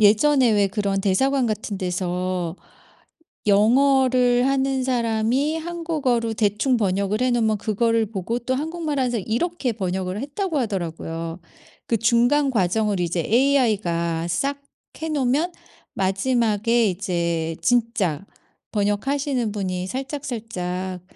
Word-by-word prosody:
예전에 240 Hz, +5 st, +5 dB
왜 205 Hz, -2 st, +3 dB
그런 195 Hz, -1 st, -1 dB
대사관 255 Hz, +7 st, +2 dB
같은 215 Hz, -2 st, -3 dB
데서 180 Hz, -1 st, -2 dB, 0.9 s
영어를 250 Hz, +3 st, +4 dB
하는 270 Hz, -1 st, +1 dB
사람이 245 Hz, +4 st, +1 dB
한국어로 310 Hz, -9 st, -1 dB
대충 215 Hz, +4 st, +1 dB
번역을 200 Hz, +1 st, 0 dB
해 255 Hz, -, +2 dB
놓으면 220 Hz, -3 st, +1 dB
그거를 225 Hz, +1 st, +1 dB
보고 215 Hz, +3 st, -3 dB
또 255 Hz, +2 st, -1 dB
한국말하면서 290 Hz, -6 st, -1 dB
이렇게 255 Hz, -, -1 dB
번역을 190 Hz, -2 st, -3 dB
했다고 310 Hz, +5 st, -3 dB
하더라고요. 165 Hz, -, -3 dB, 0.5 s
그 230 Hz, -, +1 dB
중간 240 Hz, +6 st, +3 dB
과정을 210 Hz, -2 st, +1 dB
이제 175 Hz, 0 st, -1 dB
AI가 200 Hz, -, +1 dB
싹 275 Hz, +12 st, -1 dB, 0.4 s
해 320 Hz, -, -2 dB
놓으면 295 Hz, +4 st, +1 dB, 0.4 s
마지막에 220 Hz, +2 st, +1 dB
이제 170 Hz, -3 st, -2 dB
진짜 225 Hz, -, +1 dB, 0.5 s
번역하시는 240 Hz, +4 st, 0 dB
분이 185 Hz, -3 st, -3 dB
살짝살짝 215 Hz, -, -4 dB
225 Hz, 270 characters per minute, -23 LUFS, 190-260 Hz, 0.9 s, 예전에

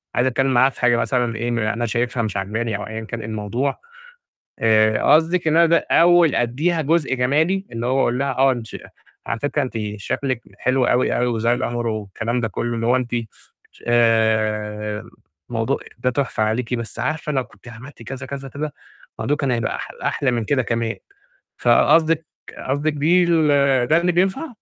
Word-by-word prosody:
عايز 125 Hz, +1 st, +2 dB
أتكلم 130 Hz, +1 st, +1 dB
معاها 130 Hz, +2 st, +5 dB
في 135 Hz, -, -14 dB
حاجة 120 Hz, -1 st, +4 dB
مثلًا 125 Hz, -1 st, 0 dB
في 110 Hz, -, -6 dB
إيه 120 Hz, +2 st, -2 dB, 0.2 s
أنا 120 Hz, 0 st, -2 dB
شايفها 120 Hz, +1 st, -1 dB
مش 100 Hz, -2 st, -3 dB
عاجباني، 110 Hz, +3 st, -2 dB
أو 105 Hz, -, -6 dB
أيًا 110 Hz, 0 st, -5 dB
كان 115 Hz, +1 st, -6 dB
إيه 110 Hz, -, -7 dB
الموضوع 110 Hz, +5 st, -2 dB, 0.8 s
آآ، 110 Hz, -1 st, +3 dB
قصدِك 165 Hz, +1 st, +2 dB
إن 165 Hz, +1 st, +4 dB
ده 170 Hz, -, +2 dB
أول 170 Hz, -2 st, +5 dB
أديها 155 Hz, +8 st, 0 dB
جزء 155 Hz, -2 st, +1 dB
جمالي، 155 Hz, +10 st, +1 dB
اللي 115 Hz, +1 st, -3 dB
هو 130 Hz, +2 st, +1 dB
أقول 125 Hz, -1 st, +1 dB
لها 140 Hz, 0 st, 0 dB
آه 135 Hz, +1 st, +3 dB
انتش 120 Hz, -3 st, -6 dB, 0.5 s
على 115 Hz, -, -3 dB
فكرة 145 Hz, 0 st, -1 dB
أنتِ 130 Hz, -, -5 dB, 0.2 s
شكلِك 125 Hz, +4 st, -3 dB, 0.2 s
حلو 130 Hz, 0 st, +1 dB
أوي، 125 Hz, -, +2 dB
أوي 125 Hz, -, +1 dB
والأمر 120 Hz, 0 st, -1 dB
والكلام 110 Hz, +2 st, -3 dB
ده 115 Hz, -, -1 dB
كله، 120 Hz, +4 st, -3 dB
اللي 115 Hz, 0 st, -2 dB
هو 125 Hz, +2 st, +4 dB
أنتِ 125 Hz, -1 st, -3 dB, 0.6 s
ش -, -, -19 dB
آآ، 110 Hz, -2 st, +1 dB, 0.4 s
موضوع -, -, -1 dB, 0.2 s
ده 125 Hz, -, 0 dB
تحفة 125 Hz, -3 st, -1 dB
عليكِ 115 Hz, +3 st, -1 dB
بس 115 Hz, -2 st, -5 dB
عارفة 155 Hz, -1 st, -2 dB
لو 130 Hz, -2 st, 0 dB
كنتِ 120 Hz, -, -17 dB
عملتِ 120 Hz, +3 st, -12 dB
كذا 130 Hz, +2 st, -7 dB
كذا، 135 Hz, 0 st, -6 dB
كذا، 150 Hz, +2 st, -5 dB, 0.5 s
الموضوع 145 Hz, -, 0 dB
كان 140 Hz, -3 st, -1 dB
هيبقى 120 Hz, -2 st, -1 dB
أحل -, -, -9 dB
أحلى 135 Hz, -, 0 dB
من 120 Hz, -2 st, -1 dB
كده 130 Hz, +4 st, +1 dB
كمان، 115 Hz, -1 st, -2 dB, 0.6 s
فقصدِك 165 Hz, 0 st, +3 dB, 0.4 s
قصدِك 145 Hz, +3 st, 0 dB
بيه 165 Hz, +5 st, +3 dB, 0.6 s
ده 155 Hz, +6 st, +3 dB
اللي 175 Hz, +1 st, +1 dB
بينفع. 190 Hz, -, +1 dB
125 Hz, 180 wpm, -21 LUFS, 115-145 Hz, 0.8 s, معاها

